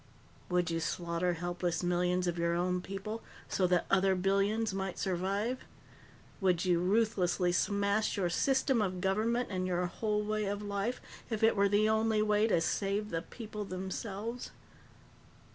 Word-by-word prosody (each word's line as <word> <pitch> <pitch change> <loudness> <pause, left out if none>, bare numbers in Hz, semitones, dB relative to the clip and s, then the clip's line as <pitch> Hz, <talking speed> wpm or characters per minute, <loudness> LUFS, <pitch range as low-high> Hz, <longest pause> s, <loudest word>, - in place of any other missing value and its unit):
"Would 180 -1 +1
you 165 - 0
slaughter 170 +1 -1
helpless 175 +1 -2
millions 180 +1 +1
of 175 -1 -1
your 170 0 +1
own 180 +1 0
people 200 +4 -5 0.3
so 185 - +1
that 180 -1 +2
other 195 0 +4
billions 200 +3 +1
might 190 -1 -3
survive? 195 +7 -1 0.8
Would 185 -3 +2
you 175 -2 +3
ruthlessly 185 -2 +2
smash 200 +3 +1
your 185 -3 +1
system 265 +3 +2
of 185 -3 -1
government 220 +6 +1
and 185 -1 -1
your 180 0 0
whole 210 +3 -1
way 215 0 -1
of 205 +1 -3
life 205 +4 -2 0.3
if 220 -2 -2
it 225 - +5
were 200 0 +3
the 205 +2 +3
only 220 0 +2
way 210 +1 +3
to 175 -7 +2
save 200 +4 -1
the 165 - -1
people 210 +1 -7
themselves?" 200 +5 -5
195 Hz, 155 wpm, -32 LUFS, 180-215 Hz, 0.8 s, it